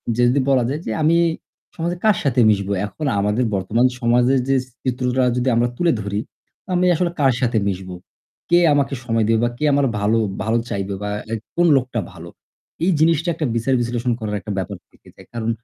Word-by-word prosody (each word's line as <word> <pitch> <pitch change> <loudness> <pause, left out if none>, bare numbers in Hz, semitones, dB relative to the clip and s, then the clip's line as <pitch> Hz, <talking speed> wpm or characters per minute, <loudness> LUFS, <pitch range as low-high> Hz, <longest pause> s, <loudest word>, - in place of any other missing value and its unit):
যে 120 - +1
যদি 135 +3 +2
বলা 130 -3 +3
যায় 150 +4 -3
যে - - -3
আমি 165 +2 +4 0.6
সমাজে 170 +2 -2
কার 215 -4 +4
সাথে 135 -3 +1
মিশবো? 100 -1 0
এখন 150 +9 -6
আমাদের 105 +5 +1
বর্তমান 105 +6 +1
সমাজের 125 +2 +3
যে 135 - +3 0.3
চিত্রটা 125 0 0
যদি 125 +1 -1
আমরা 120 +1 +2
তুলে 175 -1 +2
ধরি, 100 0 -3 0.5
আমি 180 0 +2
আসলে 175 +1 0
কার 135 -3 +4
সাথে 120 -2 +1
মিশবো? 95 -1 -4 0.5
কে 175 - +5
আমাকে 140 -1 +1
সময় 115 -1 +1
দেবে 115 0 +2
বা 120 - +2
কে 150 - -5
আমার 140 0 +3
ভালো 105 +3 +2 0.3
ভালো 110 +2 +1
চাইবে 100 0 -3
বা 105 - -2 0.2
like 115 -1 -4
কোন 175 - +3
লোকটা 125 -2 -2
ভালো। 85 -1 -10 0.5
এই 185 - +3
জিনিসটা 165 +1 +2
একটা 155 - -3
বিচার 115 +4 0
বিশ্লেষণ 120 +1 -1
করার 105 -2 -3
একটা 100 +3 -7
ব্যাপার 95 -2 -4
থেকে - - -24
যায়। - - -16
কারণ 115 -1 -3
120 Hz, 195 wpm, -20 LUFS, 110-140 Hz, 0.6 s, কে